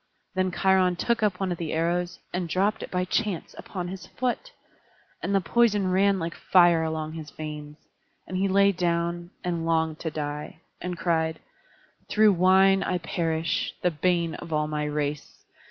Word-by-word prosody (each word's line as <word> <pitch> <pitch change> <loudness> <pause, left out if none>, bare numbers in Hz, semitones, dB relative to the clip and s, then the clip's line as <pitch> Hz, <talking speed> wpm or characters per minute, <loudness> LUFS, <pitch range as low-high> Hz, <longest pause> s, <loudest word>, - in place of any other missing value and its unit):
Then 185 -1 +1
Cheiron 185 0 +3
took 235 +6 0
up 205 -4 +1
one 190 -2 -1
of 175 - -3
the 165 -3 -3
arrows, 175 +2 0 0.2
and 175 -1 -2
dropped 200 +6 +1
it - - -6
by 180 0 -1
chance 185 -1 -1
upon 180 -3 -6
his 185 -1 -8
foot; 255 - -3 0.7
and 200 - 0
the - - +5
poison 205 0 +2
ran 195 +1 +3
like 165 -1 -3
fire 175 -3 +4
along 160 -1 -3
his 160 -2 -7
veins, 150 -1 -7 0.5
and 185 - -6
he 190 +2 +2
lay 200 +1 +4
down, 170 -1 -1
and 170 -2 -2
longed 160 -1 0
to 160 - -3
die; 150 +1 -5 0.2
and 180 -1 -4
cried: 160 -1 0 0.7
"Through 215 -1 +5
wine 190 +2 +5
I 185 -1 0
perish, 165 -2 -1
the 180 - +3
bane 170 +1 +1
of 165 - -8
all 150 -1 +1
my 150 -1 -2
race. 150 0 -4
175 Hz, 170 wpm, -26 LUFS, 160-190 Hz, 0.7 s, the